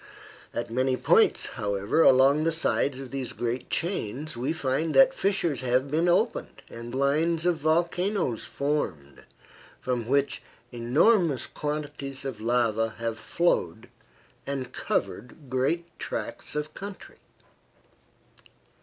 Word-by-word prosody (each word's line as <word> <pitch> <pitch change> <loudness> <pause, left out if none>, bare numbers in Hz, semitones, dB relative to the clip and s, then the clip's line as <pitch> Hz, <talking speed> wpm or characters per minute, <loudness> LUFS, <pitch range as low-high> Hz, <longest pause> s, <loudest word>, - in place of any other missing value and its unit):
At 120 - -4
many 130 +2 +1
points, - - +4
however, 100 +8 0
along 135 +2 +6
the 165 - +2
sides 145 -4 0
of 135 -2 -8
these 130 -2 -4
great 120 +1 -3
chains 155 - -2
we 125 +5 -1
find 155 0 -1
that 135 - +7
fissures 175 - 0
have 130 +2 +1
been 165 +3 +2
opened 215 +7 0
and 120 +1 -7
lines 155 +5 +1
of 175 -2 +2
volcanoes 170 - 0
formed, 90 - -3 0.6
from 125 -3 -2
which 140 +1 +1 0.3
enormous 135 - +3
quantities 145 -2 -5
of 125 -6 -5
lava 115 -1 +1
have 115 -1 -3
flowed 110 - 0 0.6
and 135 -2 -4
covered 125 +4 -3
great 135 +7 +1
tracts - - -5
of 150 +1 -3
country. 200 0 -9
135 Hz, 120 wpm, -27 LUFS, 120-160 Hz, 0.6 s, that